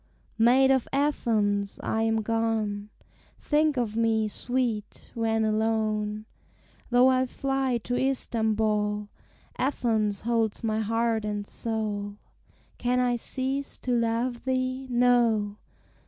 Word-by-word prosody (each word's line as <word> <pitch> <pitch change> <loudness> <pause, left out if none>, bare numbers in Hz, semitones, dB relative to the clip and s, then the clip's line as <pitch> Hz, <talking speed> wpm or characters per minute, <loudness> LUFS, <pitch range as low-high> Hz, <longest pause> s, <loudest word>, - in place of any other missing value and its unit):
] - - -36
Maid 265 +2 +5
of 265 -2 +2
Athens! 215 -8 0
I 220 - 0
am 225 -1 +1
gone. 220 -2 -1 0.5
Think 300 -1 +1
of 225 -3 -1
me, 225 -1 +2
sweet! 235 -1 -3
when 225 -1 +1
alone. 215 -1 0 0.6
Though 245 +1 +5
I 260 0 +2
fly 270 -1 -1
to 245 - -3
Istambol, 220 -5 0 0.5
Athens 220 -6 0
holds 230 -2 0
my 220 -1 0
heart 225 0 0
and 210 -1 -3
soul: 210 -2 -3 0.6
Can 250 +1 +1
I 245 -1 +2
cease 265 +3 -3
to 255 - -4
love 235 +1 0
thee? 255 0 -1
No! 240 -4 +2
225 Hz, 115 wpm, -27 LUFS, 215-250 Hz, 0.6 s, Maid